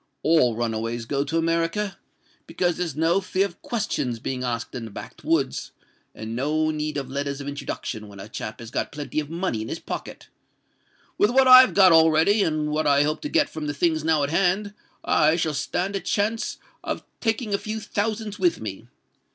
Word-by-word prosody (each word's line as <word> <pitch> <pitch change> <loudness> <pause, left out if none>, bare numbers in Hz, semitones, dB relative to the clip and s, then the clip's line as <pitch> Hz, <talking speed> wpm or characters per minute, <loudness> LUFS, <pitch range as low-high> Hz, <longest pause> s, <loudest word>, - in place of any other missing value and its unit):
All 155 -8 +4
run 115 0 -1
a 110 - -2
ways 115 +1 -3
go 140 +3 0
to 160 +3 -1
America—because 165 +1 -2
there's 170 -6 -3
no 165 +5 +2
fear 190 +1 0
of 175 -4 -9
questions 205 - -2
being 130 +2 -4
asked 120 -2 -3
in 120 -3 -5
the - - -8
back 100 - -10
woods, - - 0 0.4
and 110 +1 -6
no 155 +5 +1
need 150 -1 -3
of 135 -2 -3
letters 140 0 -3
of 140 - -7
introduction 125 -6 -5
when 100 -1 -12
a 95 - -8
chap 110 -1 -6
has 115 0 -9
got - - -2
plenty 145 -1 -3
of 150 -1 -4
money 165 - -2
in 110 - -5
his - - -3
pocket. - - -7 0.9
With 205 - +5
what 260 +2 +4
I've 255 0 +9
got 190 -2 +7
already, 160 +5 +5
and 155 -3 0
what 155 0 0
I 140 0 +5
hope 150 +1 -1
to 295 - -4
get 295 -3 +3
from 155 - -6
the 145 - -3
things 160 0 +1
now 160 -2 +2
in 140 - -1
hand, 195 +4 +1 0.3
I 155 +2 +4
shall 160 -2 0
stand 180 +7 -2
a - - 0
chance 215 +4 -1 0.3
of - - -3 0.2
taking 225 -1 -1
a 200 - +1
few 220 +1 -4
thousands 215 0 -3
with 350 -2 +2
me. - - -7
160 Hz, 200 wpm, -24 LUFS, 140-200 Hz, 0.9 s, I've